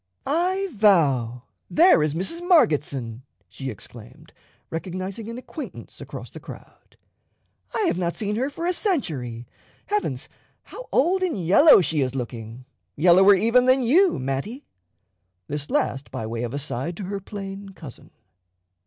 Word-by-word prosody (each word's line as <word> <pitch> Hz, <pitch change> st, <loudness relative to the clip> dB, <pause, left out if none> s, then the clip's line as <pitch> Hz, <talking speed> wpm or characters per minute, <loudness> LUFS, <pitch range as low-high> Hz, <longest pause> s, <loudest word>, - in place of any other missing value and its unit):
"I 365 Hz, +6 st, 0 dB
vow, 140 Hz, -, +2 dB, 0.3 s
there 340 Hz, -, +5 dB
is 150 Hz, 0 st, 0 dB
Mrs. 265 Hz, -, -2 dB
Margetson," 145 Hz, -, +2 dB, 0.3 s
she 135 Hz, -1 st, -7 dB
exclaimed, 120 Hz, +7 st, -11 dB, 0.4 s
recognizing 185 Hz, +6 st, -5 dB
an 230 Hz, -, -6 dB
acquaintance 280 Hz, +4 st, -9 dB
across -, -, -9 dB
the -, -, -9 dB
crowd: -, -, -14 dB, 0.8 s
"I -, -, 0 dB
have 260 Hz, -, 0 dB
not 170 Hz, -1 st, -1 dB
seen 210 Hz, -1 st, -2 dB
her 260 Hz, +5 st, -1 dB
for 330 Hz, +4 st, -6 dB
a 360 Hz, -, +1 dB
century. 140 Hz, -, -2 dB, 0.4 s
Heavens, 415 Hz, 0 st, -2 dB, 0.4 s
how -, -, -11 dB
old 360 Hz, +7 st, +2 dB
and 365 Hz, -, 0 dB
yellow 195 Hz, -, +6 dB
she 160 Hz, -3 st, 0 dB
is 130 Hz, 0 st, -1 dB
looking 120 Hz, -1 st, -6 dB, 0.3 s
yellower 185 Hz, +5 st, +6 dB
even 230 Hz, +6 st, +3 dB
than 260 Hz, 0 st, +4 dB
you, 345 Hz, +11 st, +4 dB
Mattie!" 135 Hz, -, -4 dB, 0.8 s
this 145 Hz, -, -4 dB
last 255 Hz, -, -1 dB
by 110 Hz, -, -5 dB
way 115 Hz, +1 st, -4 dB
of 120 Hz, +2 st, -4 dB
aside 145 Hz, +3 st, -3 dB
to 205 Hz, -, -5 dB
her 200 Hz, +2 st, -4 dB
plain 195 Hz, 0 st, -8 dB
cousin. 160 Hz, -9 st, -12 dB
185 Hz, 145 wpm, -24 LUFS, -, 0.8 s, yellow